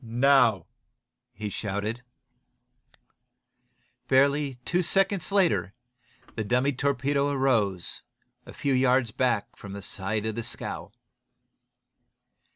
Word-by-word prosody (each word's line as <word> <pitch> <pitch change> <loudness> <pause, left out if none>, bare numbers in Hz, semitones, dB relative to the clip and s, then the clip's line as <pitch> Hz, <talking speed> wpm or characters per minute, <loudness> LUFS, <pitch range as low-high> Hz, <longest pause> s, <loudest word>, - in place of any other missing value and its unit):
"Now!" 120 -5 +3 0.7
he 105 +1 -5
shouted. 105 +4 -3 2.1
Barely 140 +1 +3
two 180 0 +1
seconds 195 +1 +1
later 180 - +2 0.6
the 110 - -4
second 105 - -4
dummy 125 +4 +2
torpedo 140 +1 0
rose, 105 - 0 0.4
a - - -12
few 140 - -1
yards 125 -2 +3
back 115 -3 0
from 100 -1 -10
the 100 -1 -7
side 105 +2 -2
of 110 - -1
the 115 - -3
scow. - - -6
125 Hz, 105 wpm, -27 LUFS, 105-140 Hz, 2.1 s, Now